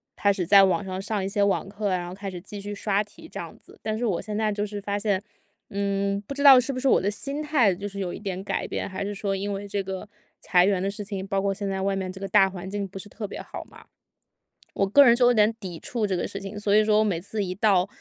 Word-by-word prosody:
开 200 - +3
始 190 -3 -1
在 200 +1 +8
网 185 -1 +2
上 185 0 -4
上 205 0 -2
一 - - -1
些 200 +1 +1
网 200 -1 +1
课 205 0 -2
啊， 185 - +1
然 175 -1 -5
后 175 - -7
开 195 +1 -6
始 180 -2 -7
继 200 +2 -8
续 205 +1 -5
刷 200 0 0
题 215 +10 -13
这 - - -6
样 - - -8
子。 - - -17
但 215 0 -2
是 240 - -1
我 195 -7 0
现 210 - -5
在 215 -1 +1
就 205 0 -2
是 205 0 -4
发 200 0 -2
现， 200 -2 0 0.5
嗯， 200 0 -1
不 280 - -5
知 285 - -2
道 270 -3 +10
是 260 +3 -1
不 255 - -4
是 270 - 0
我 - - +5
的 195 - +1
心 275 +8 -4
态 285 -10 +3
就 200 +3 -5
是 200 0 -7
有 180 -2 -3
一 - - -7
点 190 -2 -4
改 - - -2
变， - - -3
还 190 0 -4
是 205 +1 -4
说 200 -1 -1
因 200 +1 -3
为 200 +1 -5
这 200 0 -2
个 190 +1 -6 0.3
裁 180 -1 +4
员 195 -1 +2
的 195 - 0
事 205 +1 -5
情， 195 -2 -5
包 195 0 0
括 200 0 +1
现 200 +1 -3
在 195 0 -2
外 195 0 0
面 190 -1 -3
这 190 - -9
个 195 - -3
大 195 -2 +5
环 190 -1 -7
境 200 0 -3
不 195 +1 -9
是 205 - -10
特 210 0 -6
别 - - -7
好 - - -8
嘛， - - -16 0.9
我 195 - +2
个 285 +9 +7
人 235 -3 +7
就 245 0 +4
有 245 - +6
点 215 -1 +4
抵 180 -5 -7
触 235 -3 -2
这 195 -2 0
个 175 - -2
事 195 - -6
情。 200 +1 -7
所 205 -1 +2
以 215 - +6
说 215 0 +4
我 - - +4
每 195 -6 0
次 205 +4 -3
一 185 -1 -4
到 195 -2 +3
200 Hz, 325 characters per minute, -25 LUFS, 195-210 Hz, 0.9 s, 道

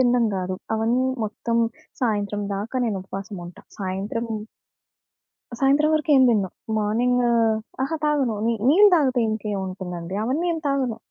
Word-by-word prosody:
తిండం 245 -2 +3
గాదు. 185 0 -3 0.2
అవన్నీ 235 +4 +1 0.2
మొత్తం 230 +2 -2 0.4
సాయంత్రం 205 -3 0
దాకా 215 +6 -4
నేను 210 -4 -1
ఉపవాసం 195 +1 -7
ఉంటా. 175 - -12 0.2
సాయంత్రము 205 +4 -3 1.2
సాయంత్రం 280 +3 +3
వరకు 310 0 +1
ఏం 265 - +6
తినను. 210 -5 +2 0.3
మార్నింగ్ 235 +4 +1 0.6
అహా! 275 +5 -1
తాగను. 285 -6 +1
ని 230 - +2
నీళ్ళు 405 +8 +7
తాగితే 265 -6 +2
ఇంకేముంటుందండి. 190 -4 -4
అవన్నీ 275 +10 0
ఏం 330 - -2
తాగను. 270 -5 0
230 Hz, 130 wpm, -23 LUFS, 200-265 Hz, 1.2 s, నీళ్ళు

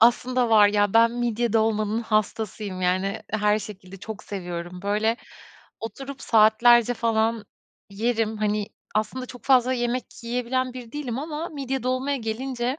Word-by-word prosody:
Aslında 245 +1 +3
var 210 -2 +7
ya, 205 0 +1
ben 230 0 +6
midye 240 -1 -1
dolmanın 220 -1 +1
hastasıyım, 215 -2 -2
yani, 185 +2 0
her 210 0 +2
şekilde 195 -3 -9
çok 205 +1 -8
seviyorum. 175 -2 -6
Böyle, 210 +3 +1 0.6
oturup 270 +5 -7
saatlerce 230 +2 +5
falan 225 -1 0 0.5
yerim, 220 +1 0
hani, 210 -1 0 0.3
aslında 255 +4 -1
çok 245 0 -12
fazla 255 -1 +4
yemek 245 0 -1 0.2
yiyebilen 250 +2 -1
biri 245 -2 -9
değilim 260 -5 -4
ama 310 +3 -4
midye 270 -3 -4
dolmaya 255 +3 0
gelince 245 +3 -3
225 Hz, 135 wpm, -25 LUFS, 210-250 Hz, 0.6 s, var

